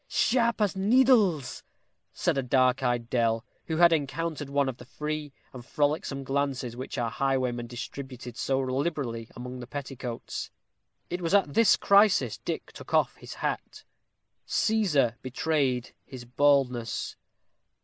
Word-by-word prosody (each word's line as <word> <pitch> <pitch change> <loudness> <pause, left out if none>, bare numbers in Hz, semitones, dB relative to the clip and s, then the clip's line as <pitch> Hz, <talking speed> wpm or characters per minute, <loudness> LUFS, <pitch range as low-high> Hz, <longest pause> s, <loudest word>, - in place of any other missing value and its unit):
"Sharp 235 -2 +2
as 205 -3 +2
needles," 205 - +3 0.5
said - - 0
a 135 - +1
dark 130 0 +2
eyed 120 -2 0
dell, 115 -1 +1 0.2
who 160 - -1
had 170 0 +6
encountered 150 0 -2
one 140 0 +1
of 130 -2 -4
the 125 - -12
free 150 +2 -4 0.2
and 125 -2 -9
frolicsome 145 0 -1
glances 135 -3 -2
which 130 +2 -6
our 115 -2 -1
highwayman 130 -3 -1
distributed 125 0 -7
so 135 +2 0
liberally 130 -4 -2
among 125 +1 -7
the 120 - -8
petticoats. 130 -3 -6 0.6
It 175 +1 -2
was 170 +3 +1
at 175 -8 +2
this 230 +5 +5
crisis 200 0 +4
Dick - - -5
took - - -5
off - - +2
his - - -10
hat. - - -4 0.6
Cæsar 150 - +2
betrayed 130 -1 -1
his 130 -3 -10
baldness. 125 -2 +1
135 Hz, 140 wpm, -28 LUFS, 125-160 Hz, 0.6 s, had